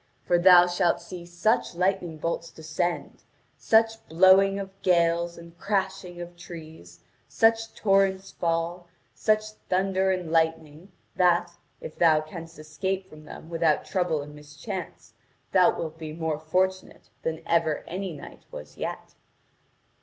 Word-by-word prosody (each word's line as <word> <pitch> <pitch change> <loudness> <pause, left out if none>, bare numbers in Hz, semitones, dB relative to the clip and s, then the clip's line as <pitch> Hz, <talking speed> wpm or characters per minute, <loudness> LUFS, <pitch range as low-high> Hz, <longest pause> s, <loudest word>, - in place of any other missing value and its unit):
For 175 - +2
thou 180 0 +8
shalt 175 -1 +1
see 175 0 -9
such 175 +3 0
lightning 180 -2 0
bolts 165 +1 -3
descend, 170 +2 -4 0.3
such 225 0 +2
blowing 190 +4 +5
of 195 -1 -5
gales 170 -1 +2
and 170 0 -13
crashing 190 -3 -2
of 175 0 -8
trees, 160 - -12 0.3
such 225 0 +2
torrents 195 -2 +2
fail, 170 +1 -2 0.3
such 215 0 0 0.2
thunder 190 +1 +1
and 180 -3 -2
lightning, 160 +1 -1 0.3
that, 175 -1 +3 0.3
if 155 - -9
thou 160 -3 +5
canst 165 +2 -9
escape 190 +5 -4
from 155 0 -13
them 155 - -11
without 165 -2 +1
trouble 175 -6 -1
and 150 +1 -11
mischance, 150 - -8 0.4
thou 185 -2 +4
wilt 160 0 -5
be 155 -1 -6
more 160 -2 -2
fortunate 185 +4 -2
than 160 0 -4
ever 165 -2 +1
any 190 +1 -4
knight 150 - -11
was 75 0 -10
yet.' - - -6
175 Hz, 135 wpm, -26 LUFS, 160-190 Hz, 0.4 s, thou